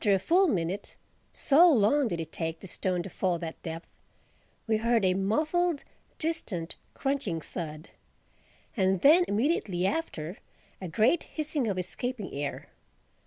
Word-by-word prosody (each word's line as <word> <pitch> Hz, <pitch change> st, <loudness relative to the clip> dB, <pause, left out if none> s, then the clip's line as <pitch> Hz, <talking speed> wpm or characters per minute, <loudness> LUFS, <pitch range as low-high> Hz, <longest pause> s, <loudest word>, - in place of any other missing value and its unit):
After 205 Hz, -2 st, +4 dB
a -, -, +3 dB
full 355 Hz, -, +3 dB
minute 190 Hz, -, -2 dB, 0.4 s
(so 320 Hz, +5 st, +5 dB
long 255 Hz, +3 st, +4 dB
did 170 Hz, -5 st, -3 dB
it 160 Hz, -1 st, -5 dB
take 165 Hz, -1 st, -3 dB
the -, -, -9 dB
stone 180 Hz, -1 st, -2 dB
to 195 Hz, -, -7 dB
fall 180 Hz, -1 st, 0 dB
that 165 Hz, -1 st, -7 dB
depth) 165 Hz, 0 st, -6 dB, 0.8 s
we 220 Hz, -1 st, +2 dB
heard 230 Hz, -1 st, +2 dB
a 185 Hz, -, +4 dB
muffled, 305 Hz, -, +1 dB, 0.3 s
distant, 225 Hz, -, -3 dB, 0.2 s
crunching 270 Hz, -12 st, -1 dB
thud—and 175 Hz, +4 st, -5 dB
then 330 Hz, +5 st, +7 dB
immediately 205 Hz, -, 0 dB
after, 190 Hz, -, -2 dB, 0.4 s
a 185 Hz, -, -4 dB
great 230 Hz, -, +3 dB, 0.2 s
hissing 300 Hz, -5 st, 0 dB
of 195 Hz, -3 st, -1 dB
escaping 210 Hz, +4 st, -4 dB
air. 145 Hz, 0 st, -4 dB
200 Hz, 140 wpm, -29 LUFS, 175-280 Hz, 0.8 s, then